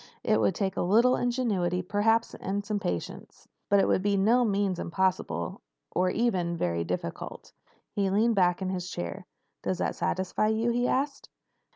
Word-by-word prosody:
It 110 Hz, -, +2 dB
would 100 Hz, -2 st, +2 dB
take 195 Hz, -2 st, -1 dB
a -, -, -1 dB
little 230 Hz, +8 st, +4 dB
ingenuity, 205 Hz, -8 st, 0 dB
perhaps, 210 Hz, +4 st, +1 dB
and 200 Hz, +2 st, -3 dB, 0.2 s
patience. 90 Hz, -, -5 dB, 0.2 s
But 200 Hz, -, +5 dB
it -, -, +3 dB
would -, -, +2 dB
be 200 Hz, 0 st, +1 dB
by 195 Hz, -, +2 dB
no 240 Hz, +4 st, +4 dB
means 200 Hz, -4 st, 0 dB
impossible 170 Hz, -, -1 dB, 0.3 s
or 185 Hz, +1 st, +1 dB
even 180 Hz, -6 st, 0 dB
very 85 Hz, -, 0 dB
difficult." 85 Hz, 0 st, -5 dB, 0.4 s
He 200 Hz, -1 st, 0 dB
leaned 220 Hz, +4 st, +3 dB
back 180 Hz, -2 st, +2 dB
in 185 Hz, -, -1 dB
his 180 Hz, -1 st, -3 dB
chair. 85 Hz, -, -5 dB, 0.3 s
"Does 185 Hz, -, -1 dB
that -, -, -1 dB
satisfy 190 Hz, +3 st, 0 dB
you?" 220 Hz, +2 st, +1 dB
he 245 Hz, +1 st, +1 dB
asked. 275 Hz, +1 st, -1 dB
195 Hz, 170 wpm, -28 LUFS, 180-225 Hz, 0.4 s, But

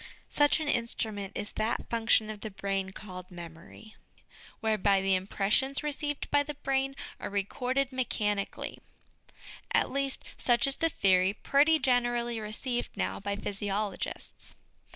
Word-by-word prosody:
Such 290 Hz, +1 st, +4 dB
an 310 Hz, -, -3 dB
instrument 220 Hz, -5 st, -2 dB
is 205 Hz, -, -3 dB
that 220 Hz, +2 st, -1 dB
function 225 Hz, -2 st, +3 dB
of 210 Hz, -1 st, -9 dB
the 220 Hz, -, -4 dB
brain 195 Hz, -1 st, -2 dB
called 185 Hz, -2 st, -9 dB
memory, 170 Hz, +5 st, -11 dB, 0.7 s
whereby 210 Hz, -3 st, +3 dB
the 195 Hz, 0 st, +2 dB
impressions 205 Hz, +9 st, +1 dB
received 295 Hz, -1 st, -2 dB
by 290 Hz, -, +5 dB
the 295 Hz, 0 st, -4 dB
brain 270 Hz, 0 st, 0 dB, 0.2 s
are -, -, -4 dB
recorded 250 Hz, +7 st, 0 dB
mechanically 210 Hz, -6 st, -1 dB, 0.9 s
at -, -, +3 dB
least, 275 Hz, -1 st, 0 dB
such 240 Hz, +2 st, +4 dB
is 275 Hz, 0 st, 0 dB
the 330 Hz, -, +2 dB
theory 190 Hz, -, +4 dB
pretty 295 Hz, +3 st, +4 dB
generally 240 Hz, -3 st, +1 dB
received 240 Hz, +3 st, -3 dB
now 95 Hz, +1 st, -1 dB
by 200 Hz, -, -2 dB
physiologists. 200 Hz, 0 st, -3 dB
220 Hz, 130 wpm, -30 LUFS, 195-270 Hz, 0.9 s, by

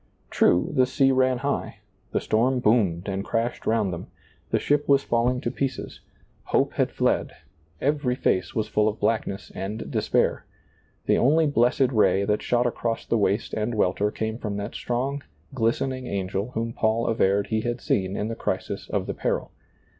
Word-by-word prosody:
True, 90 Hz, -, +3 dB
the 130 Hz, -2 st, +3 dB
sea 135 Hz, +1 st, +3 dB
ran 130 Hz, -1 st, +3 dB
high, 140 Hz, -, -2 dB, 0.3 s
the -, -, +1 dB
storm 125 Hz, +4 st, +1 dB
boomed 105 Hz, -7 st, +2 dB
and 100 Hz, 0 st, -2 dB
crashed 115 Hz, +3 st, -2 dB
round 110 Hz, -5 st, +1 dB
them, 85 Hz, -, -6 dB, 0.4 s
the -, -, +2 dB
ship 145 Hz, 0 st, 0 dB
was 140 Hz, 0 st, +5 dB
falling 120 Hz, +2 st, +1 dB
to 120 Hz, -, -2 dB
pieces, 130 Hz, -1 st, -4 dB, 0.5 s
hope -, -, +1 dB
had -, -, +1 dB
fled, -, -, 0 dB, 0.5 s
every 140 Hz, -3 st, 0 dB
fece 90 Hz, -7 st, 0 dB
was 110 Hz, -, 0 dB
full 105 Hz, 0 st, +2 dB
of 110 Hz, 0 st, -2 dB
blackness 110 Hz, -3 st, -1 dB
and 105 Hz, +3 st, -5 dB
despair; -, -, +1 dB, 0.6 s
the -, -, +3 dB
only 155 Hz, +6 st, +4 dB
blessed 130 Hz, -1 st, +2 dB
ray 100 Hz, -4 st, +3 dB
that 105 Hz, +1 st, +1 dB
shot 120 Hz, 0 st, +1 dB
across 115 Hz, -1 st, -2 dB
the -, -, 0 dB
waste 100 Hz, +2 st, 0 dB
and 110 Hz, +2 st, -1 dB
welter 105 Hz, 0 st, +1 dB
came 110 Hz, +2 st, -4 dB
from 105 Hz, -4 st, -3 dB
that 100 Hz, 0 st, -5 dB
strong, 135 Hz, +4 st, -2 dB, 0.3 s
glistening 130 Hz, +1 st, -1 dB
angel 100 Hz, +2 st, -2 dB
whom 115 Hz, +1 st, -2 dB
Paul 110 Hz, +1 st, +1 dB
averred 100 Hz, -3 st, +1 dB
he 110 Hz, 0 st, +1 dB
had 120 Hz, +1 st, -2 dB
seen 95 Hz, -3 st, -1 dB
in 105 Hz, -, -1 dB
the 115 Hz, -, -3 dB
crisis -, -, -3 dB
of -, -, -1 dB
the -, -, -3 dB
peril. -, -, -2 dB
115 Hz, 175 wpm, -25 LUFS, 105-125 Hz, 0.6 s, was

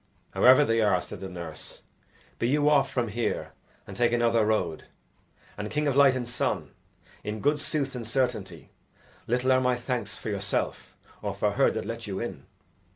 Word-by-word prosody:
"However 130 Hz, +4 st, +6 dB
they 115 Hz, -2 st, +2 dB
are," 100 Hz, -4 st, +3 dB
said -, -, -8 dB
the 95 Hz, -, -6 dB
nurse, 85 Hz, -3 st, -8 dB, 0.6 s
"be 115 Hz, -, +1 dB
you 145 Hz, +3 st, +2 dB
off 140 Hz, -2 st, +4 dB
from 120 Hz, -3 st, -1 dB
here 115 Hz, +3 st, -2 dB, 0.3 s
and -, -, -9 dB
take 120 Hz, -1 st, +2 dB
another 115 Hz, -1 st, +3 dB
road. 90 Hz, -7 st, 0 dB, 0.7 s
And, 105 Hz, 0 st, -3 dB
King 150 Hz, 0 st, -1 dB
of 140 Hz, -, +1 dB
Light 140 Hz, -2 st, +6 dB
and 125 Hz, -2 st, -3 dB
Sun! 120 Hz, -, -2 dB, 0.5 s
in 105 Hz, +1 st, -4 dB
good 145 Hz, +5 st, +2 dB
sooth 145 Hz, -2 st, -2 dB
and 120 Hz, -3 st, -5 dB
certainty, 110 Hz, -, -2 dB, 0.6 s
little 125 Hz, +2 st, +1 dB
are 130 Hz, 0 st, +4 dB
my 125 Hz, -1 st, +2 dB
thanks 120 Hz, -2 st, -3 dB
for -, -, -6 dB
yourself 100 Hz, 0 st, -2 dB, 0.3 s
or -, -, -3 dB
for -, -, +1 dB
her -, -, +3 dB
that -, -, -3 dB
let 115 Hz, +1 st, -5 dB
you 95 Hz, -1 st, -3 dB
in!" 120 Hz, -5 st, -6 dB
120 Hz, 180 wpm, -27 LUFS, 105-130 Hz, 0.7 s, However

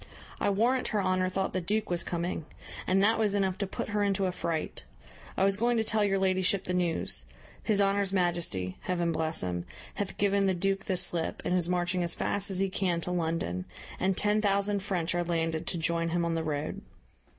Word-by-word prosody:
I -, -, +2 dB
warrant 235 Hz, +6 st, +2 dB
her 210 Hz, -3 st, 0 dB
honour 185 Hz, 0 st, +1 dB
thought 190 Hz, +1 st, -1 dB
the 185 Hz, -, 0 dB
duke 210 Hz, +3 st, -1 dB
was 175 Hz, -1 st, +2 dB
coming; 170 Hz, -2 st, -3 dB, 0.4 s
and 195 Hz, +1 st, +3 dB
that 225 Hz, +2 st, +3 dB
was 210 Hz, -2 st, +2 dB
enough 190 Hz, -2 st, 0 dB
to 200 Hz, -, -1 dB
put -, -, -4 dB
her 210 Hz, 0 st, 0 dB
into 195 Hz, -1 st, +1 dB
a 185 Hz, -, +1 dB
fright. 165 Hz, -3 st, -3 dB, 0.5 s
I -, -, +3 dB
was 195 Hz, 0 st, +3 dB
going 235 Hz, +2 st, +2 dB
to 220 Hz, -, +2 dB
tell 220 Hz, -1 st, +1 dB
your 195 Hz, -1 st, +2 dB
ladyship 190 Hz, 0 st, +2 dB
the 180 Hz, -, -3 dB
news. 175 Hz, -2 st, 0 dB, 0.4 s
His 210 Hz, -3 st, +1 dB
honour's 200 Hz, -1 st, +2 dB
majesty, 170 Hz, -, 0 dB
Heaven 175 Hz, -2 st, 0 dB
bless 160 Hz, 0 st, 0 dB
him, 90 Hz, -1 st, -2 dB, 0.3 s
hath 200 Hz, -2 st, -4 dB
given 200 Hz, -1 st, +2 dB
the 190 Hz, -, +2 dB
duke 195 Hz, +2 st, 0 dB
the 190 Hz, -3 st, 0 dB
slip, 175 Hz, -2 st, 0 dB
and -, -, +1 dB
is 180 Hz, -1 st, +2 dB
marching 180 Hz, 0 st, 0 dB
as 170 Hz, -1 st, +1 dB
fast 200 Hz, 0 st, 0 dB
as 190 Hz, -, +2 dB
he 195 Hz, +1 st, +3 dB
can 180 Hz, -3 st, 0 dB
to 180 Hz, -, -3 dB
London, 160 Hz, -, -1 dB, 0.3 s
and 190 Hz, 0 st, +1 dB
ten 210 Hz, +1 st, +2 dB
thousand 200 Hz, 0 st, +2 dB
French 180 Hz, -4 st, -1 dB
are 175 Hz, 0 st, +1 dB
landed 165 Hz, -2 st, -1 dB
to 175 Hz, -, -1 dB
join 165 Hz, +1 st, 0 dB
him 170 Hz, 0 st, 0 dB
on 170 Hz, -, 0 dB
the 165 Hz, 0 st, -1 dB
road." 150 Hz, -1 st, -3 dB
185 Hz, 215 wpm, -29 LUFS, 170-200 Hz, 0.5 s, and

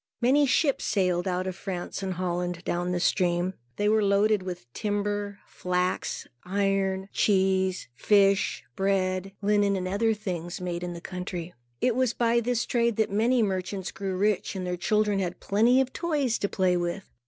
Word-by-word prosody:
Many 275 Hz, +4 st, +4 dB
ships 275 Hz, +1 st, +2 dB
sailed 180 Hz, -3 st, +1 dB
out 185 Hz, 0 st, -1 dB
of 185 Hz, -1 st, -3 dB
France 185 Hz, -1 st, -5 dB
and 190 Hz, -1 st, -3 dB
Holland, 180 Hz, -1 st, -2 dB
down 175 Hz, +1 st, -1 dB
this 175 Hz, 0 st, 0 dB
stream. 175 Hz, 0 st, +1 dB, 0.2 s
They 205 Hz, -, 0 dB
were 215 Hz, 0 st, +3 dB
loaded 200 Hz, +1 st, +3 dB
with 180 Hz, -8 st, -6 dB
timber, 205 Hz, -1 st, -2 dB
flax, 180 Hz, 0 st, -2 dB, 0.2 s
iron, 195 Hz, 0 st, 0 dB
cheese, 190 Hz, -2 st, +2 dB
fish, 195 Hz, -, +3 dB
bread, 190 Hz, -1 st, 0 dB
linen, 205 Hz, -1 st, +3 dB
and 185 Hz, -1 st, -2 dB
other 220 Hz, +4 st, +1 dB
things 180 Hz, -4 st, -5 dB
made 175 Hz, -1 st, -3 dB
in 175 Hz, 0 st, -4 dB
the 170 Hz, -, -8 dB
country. 180 Hz, -2 st, -5 dB, 0.3 s
It 245 Hz, -, +2 dB
was 255 Hz, -2 st, +1 dB
by 235 Hz, 0 st, +3 dB
this 235 Hz, 0 st, 0 dB
trade 235 Hz, -2 st, +1 dB
that 220 Hz, -1 st, +1 dB
many 230 Hz, +4 st, +3 dB
merchants 190 Hz, -1 st, -2 dB
grew 190 Hz, -1 st, -4 dB
rich, 205 Hz, 0 st, 0 dB
and 185 Hz, -1 st, -3 dB
their 180 Hz, 0 st, -1 dB
children 210 Hz, +2 st, +1 dB
had 180 Hz, -2 st, -3 dB
plenty 230 Hz, +6 st, +3 dB
of 265 Hz, -1 st, 0 dB
toys 290 Hz, -8 st, 0 dB
to 200 Hz, -, -1 dB
play 185 Hz, -2 st, +2 dB
with. 175 Hz, +2 st, -3 dB
195 Hz, 170 wpm, -27 LUFS, 180-210 Hz, 0.3 s, Many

